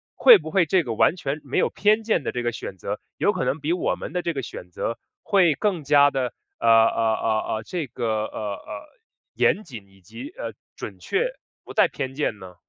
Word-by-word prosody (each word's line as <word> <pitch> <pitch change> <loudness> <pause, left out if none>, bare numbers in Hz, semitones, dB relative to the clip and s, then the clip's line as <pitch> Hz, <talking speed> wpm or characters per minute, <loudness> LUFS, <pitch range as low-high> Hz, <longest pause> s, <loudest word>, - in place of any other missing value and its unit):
会 475 -4 +9
不 160 - -8
会 185 -1 +3
这 180 +2 +2
个 120 -5 -3
完 110 - +3
全 145 -2 -3
没 135 - -3
有 - - +3
偏 215 +2 +2
见 215 -8 +1
的 - - -2
这 120 -1 -3
个 120 - 0
选 95 - -7
择， - - -4 0.2
有 - - +2
可 - - -2
能 150 - -1
比 155 +3 0
我 180 - 0
们 - - -7
的 180 - 0
这 170 - -1
个 135 - -3
选 90 -7 -9
择 115 +6 -3 0.2
会 185 -6 +4
更 180 +1 -1
加 145 0 +5
地 130 -3 -1 0.3
呃 - - 0
呃 115 0 +4
呃 110 -1 -1
呃， 110 - -6
这 160 +3 -4
个 120 0 -5 0.2
呃 - - -7 0.2
呃， 300 - -9 0.5
严 215 - +2
谨 115 - -10
以 95 0 -22
及， 115 +9 -9
呃， 115 -1 -5 0.2
准 100 -3 -7
确 440 - 0 0.4
不 - - -9
带 - - +4
偏 130 0 -5
见 135 -8 -1
呢？ 90 -2 -11
135 Hz, 240 characters per minute, -24 LUFS, 115-170 Hz, 0.5 s, 会